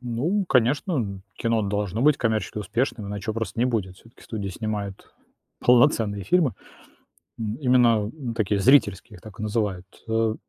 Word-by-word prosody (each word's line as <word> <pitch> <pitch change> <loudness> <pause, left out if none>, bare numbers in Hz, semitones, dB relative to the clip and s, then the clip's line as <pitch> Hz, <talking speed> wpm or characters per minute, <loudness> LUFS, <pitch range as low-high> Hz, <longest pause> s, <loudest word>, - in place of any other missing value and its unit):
Ну, 135 - -1
конечно, 135 +8 +2
м, 100 -9 -2
кино 115 -2 0
должно 100 +1 -2
быть 150 0 +5
коммерчески 110 -4 -1
успешным, 115 +2 -2
иначе 100 0 -5
его - - -4
просто 115 -2 -4
не 120 - +3
будет. 105 -7 -2
Всё-таки 115 +5 -19
студия 100 -3 -5
снимает 100 -1 -5 0.5
полноценные 115 -6 +4
фильмы. 150 - +2 0.9
М, 110 -1 -3
именно, 120 -6 +3
м, 130 -7 -5
такие 105 -2 0
зрительские, 105 -4 +3
их - - -18
так 105 -4 -13
и 110 - -4
называют, 105 -4 -1 0.2
э, 110 0 +1
110 Hz, 160 wpm, -24 LUFS, 100-125 Hz, 0.9 s, быть